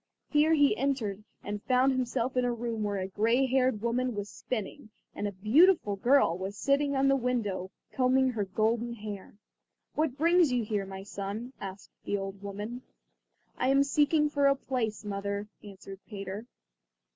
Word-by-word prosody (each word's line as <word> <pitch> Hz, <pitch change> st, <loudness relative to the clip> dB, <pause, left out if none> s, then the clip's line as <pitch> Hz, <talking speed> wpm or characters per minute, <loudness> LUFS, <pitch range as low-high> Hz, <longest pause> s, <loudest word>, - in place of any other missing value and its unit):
Here 310 Hz, +2 st, +4 dB
he 285 Hz, -7 st, +4 dB
entered 230 Hz, -7 st, -1 dB, 0.2 s
and 205 Hz, 0 st, -4 dB
found 255 Hz, +3 st, +3 dB
himself 255 Hz, 0 st, -1 dB
in 250 Hz, -, +2 dB
a 245 Hz, -, +1 dB
room 235 Hz, -1 st, -3 dB
where 205 Hz, -1 st, -1 dB
a 190 Hz, 0 st, -2 dB
gray 230 Hz, +7 st, +2 dB
haired 255 Hz, -4 st, +1 dB
woman 245 Hz, +1 st, 0 dB
was 205 Hz, 0 st, -5 dB
spinning 220 Hz, +1 st, -5 dB, 0.2 s
and 205 Hz, -, -3 dB
a -, -, -3 dB
beautiful 215 Hz, -, +4 dB
girl 240 Hz, -4 st, +3 dB
was 190 Hz, +3 st, -5 dB
sitting 280 Hz, +3 st, +1 dB
in 270 Hz, 0 st, +3 dB
the 275 Hz, -, +4 dB
window 230 Hz, -8 st, -1 dB, 0.2 s
combing 260 Hz, 0 st, +3 dB
her 220 Hz, -4 st, -1 dB
golden 225 Hz, +4 st, 0 dB
hair. 210 Hz, -3 st, -8 dB, 0.6 s
"What 300 Hz, -4 st, 0 dB
brings 335 Hz, -1 st, +4 dB
you 245 Hz, -2 st, +1 dB
here, 210 Hz, -2 st, -2 dB
my 190 Hz, 0 st, -7 dB
son?" 205 Hz, +5 st, -6 dB
asked 195 Hz, 0 st, -8 dB
the 205 Hz, -, -1 dB
old 195 Hz, 0 st, -6 dB
woman. 205 Hz, +5 st, -6 dB, 0.8 s
"I 255 Hz, -, +1 dB
am 275 Hz, +1 st, +5 dB
seeking 300 Hz, +2 st, +3 dB
for 285 Hz, -1 st, +2 dB
a 275 Hz, -, +4 dB
place, 235 Hz, -6 st, -3 dB
mother," 200 Hz, 0 st, -3 dB, 0.2 s
answered 195 Hz, -1 st, -10 dB
Peter. 200 Hz, +1 st, -6 dB
235 Hz, 170 wpm, -29 LUFS, 205-265 Hz, 0.8 s, am